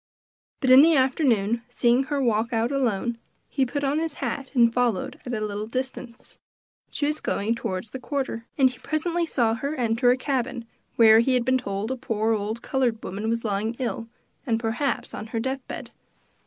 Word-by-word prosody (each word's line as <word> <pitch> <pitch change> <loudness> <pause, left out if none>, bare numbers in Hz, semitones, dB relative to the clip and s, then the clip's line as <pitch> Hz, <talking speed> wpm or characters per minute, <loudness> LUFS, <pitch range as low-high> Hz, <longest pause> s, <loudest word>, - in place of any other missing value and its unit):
But 260 -3 +3
in 260 +1 +10
the 325 +1 +6
afternoon, 245 -5 +2
seeing 245 +1 +2
her 290 -1 -1
walk 230 -3 +1
out 230 +2 0
alone, 235 -3 0 0.3
he 270 -2 0
put 285 +3 -3
on 280 +2 +1
his 320 -2 -3
hat 275 -3 -4
and 235 -2 +5
followed 240 -6 0
at 245 - -3
a - - -2
little 210 +1 -4
distance. 255 -1 -6 0.5
She 290 - -2
was 300 +1 -1
going 210 +3 0
toward 185 -5 -3
the 240 +3 -8
quarter, 255 -4 -3
and 265 -2 +5
he 245 - -14
presently 335 +2 -1
saw 235 -7 +1
her 280 +7 -3
enter 240 -1 +2
a 250 - +4
cabin 255 -3 -2 0.3
where, 220 -1 +7
he 255 +3 +3
had 245 -1 +1
been 260 +1 +3
told, 200 0 -3
a 260 - -2
poor 225 -2 0
old 215 +2 -3
colored 245 -5 0
woman 205 +4 -3
was 230 0 -1
lying 215 +2 -1
ill, 235 -2 -3 0.5
perhaps 235 +5 -2
on 215 - -6
her 225 +1 -3
death 265 +3 -2
bed. - - -7
240 Hz, 190 wpm, -25 LUFS, 225-265 Hz, 0.5 s, in